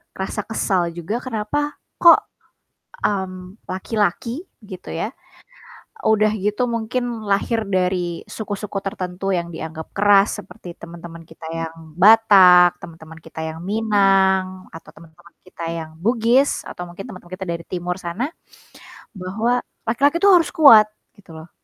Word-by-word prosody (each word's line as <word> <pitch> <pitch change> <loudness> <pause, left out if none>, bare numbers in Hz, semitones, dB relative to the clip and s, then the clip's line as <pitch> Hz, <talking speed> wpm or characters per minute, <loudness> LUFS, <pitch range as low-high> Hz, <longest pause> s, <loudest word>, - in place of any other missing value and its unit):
rasa 190 +2 -3
kesal 185 -5 -1
juga 180 +8 -5
kenapa 260 +5 -3 0.2
kok, 340 -1 +8 0.8
mmm, 190 0 -4
laki-laki, 225 - -2 0.2
gitu 185 -3 -11
ya, 210 +7 -3 1.0
udah 215 -1 +3
gitu 210 +4 0
mungkin 230 +2 -2 0.2
lahir 215 +3 0
dari 180 -2 -1
suku-suku 205 -2 -5
tertentu 185 0 -3
yang 170 -1 -3
dianggap 160 -1 -8
keras, 200 0 +4
seperti 175 -6 -11
teman-teman 170 0 -11
kita 160 0 -13
yang 165 0 -5 0.2
Batak, 190 -4 +7
temen-temen 160 -1 -12
kita 160 0 -9
yang 160 0 -6
Minang 195 -3 +1
atau 165 - -12
teman-teman 165 +1 -18
kita 185 -2 -11
yang 160 -1 -6
Bugis 235 +6 +2
atau 180 - -7
mungkin 175 +3 -9
teman-teman 185 -3 -12
kita 190 0 -7
dari 170 0 -4
timur 180 0 -3
sana, 195 - -4 0.8
bahwa 220 +7 -1 0.2
laki-laki 280 +8 +2
tuh 395 +1 +6
harus 340 -2 +2
kuat, 275 -11 +7 0.3
gitu 200 -5 -18
loh. 160 +2 -12
190 Hz, 130 wpm, -21 LUFS, 175-220 Hz, 1.0 s, kok